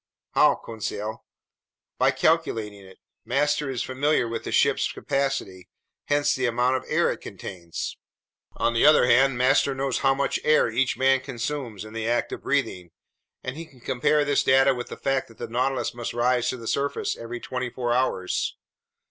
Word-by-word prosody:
"How, -, -, +5 dB
Conseil?" 110 Hz, -1 st, -5 dB, 0.8 s
"By -, -, +4 dB
calculating 110 Hz, -11 st, 0 dB
it. 95 Hz, 0 st, -15 dB, 0.3 s
Master 145 Hz, +2 st, 0 dB
is 130 Hz, -3 st, -2 dB
familiar 135 Hz, 0 st, +1 dB
with 115 Hz, -, -5 dB
the -, -, -4 dB
ship's -, -, +2 dB
capacity, 135 Hz, -10 st, -2 dB, 0.4 s
hence 145 Hz, 0 st, +2 dB
the 130 Hz, -1 st, 0 dB
amount 125 Hz, +2 st, +2 dB
of -, -, -8 dB
air -, -, +2 dB
it -, -, -6 dB
contains; 85 Hz, -3 st, -7 dB, 0.6 s
on 115 Hz, -, 0 dB
the 115 Hz, -, +2 dB
other 150 Hz, -4 st, +7 dB
hand, 130 Hz, +1 st, +4 dB
master 135 Hz, +2 st, +3 dB
knows 135 Hz, -1 st, -1 dB
how 135 Hz, 0 st, +3 dB
much 140 Hz, 0 st, 0 dB
air 155 Hz, -6 st, +3 dB
each 130 Hz, +3 st, 0 dB
man 135 Hz, 0 st, +4 dB
consumes 125 Hz, -4 st, -5 dB
in 110 Hz, -, -11 dB
the 115 Hz, 0 st, -3 dB
act 120 Hz, 0 st, 0 dB
of -, -, -6 dB
breathing, 110 Hz, -11 st, -1 dB, 0.5 s
and 130 Hz, -, -4 dB
he 165 Hz, +1 st, -8 dB
can 130 Hz, -, -20 dB
compare 135 Hz, +4 st, +1 dB
this 145 Hz, -1 st, +2 dB
data 135 Hz, +1 st, +4 dB
with 120 Hz, -1 st, -5 dB
the -, -, -8 dB
fact 135 Hz, -1 st, -1 dB
that 115 Hz, -, -18 dB
the 120 Hz, -, -5 dB
Nautilus 125 Hz, +2 st, -1 dB
must 120 Hz, -1 st, -5 dB
rise 120 Hz, 0 st, +2 dB
to 130 Hz, -, -3 dB
the 115 Hz, -, -10 dB
surface 140 Hz, +3 st, -1 dB
every 115 Hz, +1 st, -7 dB
twenty 125 Hz, 0 st, -4 dB
four 120 Hz, -1 st, -2 dB
hours 120 Hz, -7 st, 0 dB
125 Hz, 180 wpm, -25 LUFS, 115-135 Hz, 0.8 s, other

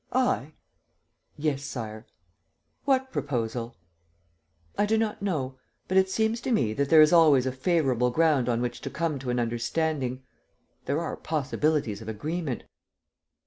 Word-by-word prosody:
I?" 245 Hz, -, +1 dB, 0.8 s
"Yes, 145 Hz, -2 st, -1 dB
Sire." 110 Hz, -5 st, -6 dB, 0.8 s
"What 265 Hz, -1 st, +2 dB
proposal?" 120 Hz, -, -3 dB, 1.0 s
"I 205 Hz, -, +1 dB
do 220 Hz, +1 st, +2 dB
not 220 Hz, -2 st, -1 dB
know, 135 Hz, -10 st, -2 dB, 0.3 s
but 185 Hz, -, -2 dB
it 190 Hz, 0 st, +4 dB
seems 220 Hz, +3 st, 0 dB
to 255 Hz, -, -2 dB
me 120 Hz, -, +2 dB
that 140 Hz, +3 st, -1 dB
there 155 Hz, -1 st, +8 dB
is 155 Hz, -, +4 dB
always 150 Hz, -6 st, +6 dB
a 130 Hz, -, 0 dB
favorable 130 Hz, -3 st, +1 dB
ground 145 Hz, -3 st, +2 dB
on 120 Hz, 0 st, +1 dB
which 120 Hz, 0 st, -4 dB
to -, -, -4 dB
come 155 Hz, -3 st, -2 dB
to 130 Hz, -1 st, -5 dB
an 125 Hz, 0 st, 0 dB
understanding... 130 Hz, +3 st, -1 dB, 0.6 s
there 145 Hz, +3 st, 0 dB
are 170 Hz, -, -3 dB
possibilities 145 Hz, -6 st, -1 dB
of 110 Hz, -, -7 dB
agreement. 150 Hz, +5 st, -3 dB
145 Hz, 145 wpm, -27 LUFS, 125-165 Hz, 1.0 s, there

